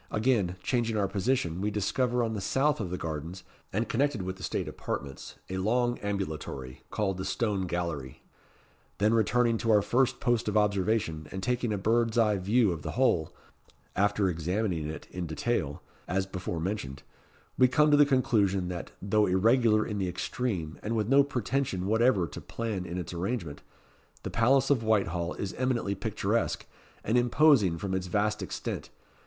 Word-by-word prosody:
Again 105 Hz, -6 st, +1 dB
changing 115 Hz, -3 st, 0 dB
our 100 Hz, -2 st, +2 dB
position, 95 Hz, -4 st, -1 dB
we 105 Hz, -, 0 dB
discover, 120 Hz, +4 st, 0 dB
on 115 Hz, -1 st, -1 dB
the 105 Hz, -, -3 dB
south 145 Hz, +8 st, +1 dB
of 100 Hz, -5 st, -3 dB
the 90 Hz, -, -3 dB
gardens, 80 Hz, +3 st, -5 dB, 0.3 s
and 110 Hz, +4 st, -1 dB
connected 135 Hz, -4 st, 0 dB
with 95 Hz, 0 st, -4 dB
the -, -, -13 dB
state -, -, -2 dB
apartments, 70 Hz, -1 st, -6 dB
a 95 Hz, -, -4 dB
long 120 Hz, +5 st, +1 dB
ambulatory, 80 Hz, -10 st, -4 dB
called 95 Hz, -3 st, -1 dB
the -, -, -2 dB
Stone 100 Hz, -2 st, -1 dB
Gallery. 85 Hz, -7 st, -4 dB, 0.7 s
Then 105 Hz, +2 st, +3 dB
returning 115 Hz, +1 st, +2 dB
to 115 Hz, -, -2 dB
our 105 Hz, -2 st, +5 dB
first 125 Hz, +4 st, +1 dB
post 120 Hz, -4 st, +1 dB
of 105 Hz, -, +1 dB
observation, 100 Hz, -6 st, +1 dB
and 95 Hz, 0 st, -5 dB
taking 125 Hz, -2 st, 0 dB
a 105 Hz, -, 0 dB
bird's 115 Hz, +3 st, +1 dB
eye 105 Hz, -3 st, +4 dB
view 105 Hz, +3 st, +2 dB
of 80 Hz, -3 st, -4 dB
the -, -, -5 dB
whole, 115 Hz, -12 st, +2 dB, 0.6 s
after 105 Hz, 0 st, +2 dB
examining 90 Hz, 0 st, -1 dB
it 80 Hz, -, -7 dB
in 90 Hz, -2 st, -4 dB
detail, 80 Hz, -3 st, -2 dB, 0.2 s
as 95 Hz, +1 st, 0 dB
before 90 Hz, -3 st, -4 dB
mentioned, 80 Hz, -7 st, -4 dB, 0.5 s
we 130 Hz, -, +5 dB
come 150 Hz, +4 st, +3 dB
to 145 Hz, -, +6 dB
the 145 Hz, -, +8 dB
conclusion, 105 Hz, -9 st, +2 dB
that, 90 Hz, -2 st, -5 dB
though 105 Hz, +1 st, +3 dB
irregular 110 Hz, +3 st, +3 dB
in 105 Hz, -2 st, -3 dB
the 95 Hz, -2 st, -1 dB
extreme, 90 Hz, -2 st, -3 dB
and 110 Hz, +2 st, -2 dB
with 110 Hz, 0 st, 0 dB
no 140 Hz, +1 st, +6 dB
pretension 125 Hz, -6 st, -1 dB
whatever 110 Hz, -2 st, +3 dB
to 75 Hz, -, -8 dB
plan 110 Hz, -6 st, -4 dB
in 85 Hz, -, -4 dB
its 90 Hz, -1 st, -5 dB
arrangement, 85 Hz, -4 st, -3 dB, 0.6 s
the -, -, -4 dB
Palace 130 Hz, +4 st, +3 dB
of 130 Hz, -5 st, +3 dB
Whitehall 90 Hz, -6 st, 0 dB
is 100 Hz, -, -4 dB
eminently 125 Hz, -6 st, 0 dB
picturesque, 105 Hz, +2 st, -1 dB, 0.4 s
and 115 Hz, +3 st, +2 dB
imposing 120 Hz, -, +4 dB
from 95 Hz, +2 st, -3 dB
its 95 Hz, -1 st, -2 dB
vast 105 Hz, +3 st, 0 dB
extent. -, -, -5 dB
105 Hz, 170 wpm, -29 LUFS, 90-120 Hz, 0.7 s, the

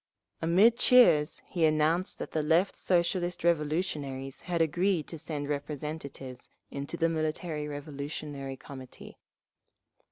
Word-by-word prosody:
Amid 195 Hz, +8 st, +5 dB
cheers 245 Hz, -13 st, +5 dB
he 170 Hz, -3 st, -2 dB
announced 155 Hz, +3 st, +2 dB
that -, -, -6 dB
the 155 Hz, -, 0 dB
Left 165 Hz, +6 st, +2 dB
Socialist 175 Hz, -1 st, 0 dB
Revolutionaries 150 Hz, -5 st, -1 dB
had 175 Hz, -2 st, -2 dB
agreed 170 Hz, +1 st, +1 dB
to 165 Hz, -, -7 dB
send 145 Hz, -2 st, -4 dB
representatives 145 Hz, -3 st, -5 dB, 0.2 s
into 140 Hz, +4 st, -5 dB
the 165 Hz, -, +2 dB
Military 155 Hz, -1 st, -2 dB
Revolutionary 145 Hz, -1 st, -6 dB
Committee…. 130 Hz, -2 st, -11 dB
155 Hz, 115 wpm, -29 LUFS, 145-170 Hz, 0.2 s, Amid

